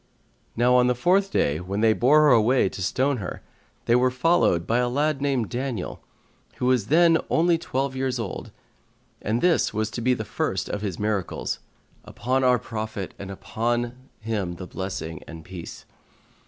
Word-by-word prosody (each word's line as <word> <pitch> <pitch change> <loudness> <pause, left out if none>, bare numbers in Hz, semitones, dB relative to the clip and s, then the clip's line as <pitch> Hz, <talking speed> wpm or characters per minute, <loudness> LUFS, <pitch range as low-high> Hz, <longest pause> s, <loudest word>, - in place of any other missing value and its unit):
Now 120 +2 +3
on 125 0 +5
the 125 - +2
fourth 185 +10 +2
day, 75 - +1
when 95 +4 -3
they 110 -1 +5
bore 140 +7 +5
her 150 - +5
away 120 -2 +4
to 95 - -8
stone 130 +9 +1
her, 95 -5 -6 0.4
they 120 - +4
were 125 +1 +4
followed 125 - +2
by 115 +2 +1
a 125 0 +1
lad 145 +2 0
named 135 -6 0
Daniel, 125 -5 -4 0.5
who - - -3
was 125 -5 +2
then 165 +2 +5
only 170 0 +3
twelve 135 -3 -2
years 130 -1 -1
old, 115 -5 -5 0.7
and 110 +3 -1
this 175 -10 +2
was 110 0 -1
to 120 - -5
be 125 +2 +2
the 110 - -5
first 115 - -2
of 105 - -3
his 100 -5 -3
miracles 105 -3 -2 0.4
(upon 130 +2 -1
our 125 -1 +5
Prophet 110 -4 -5
and 100 - -7
upon 120 +4 -2 0.3
him 105 -5 -3
the 90 - -7
blessing 90 -4 -5
and 80 -1 -10
peace!). 90 -2 -9
120 Hz, 175 wpm, -25 LUFS, 105-130 Hz, 0.7 s, on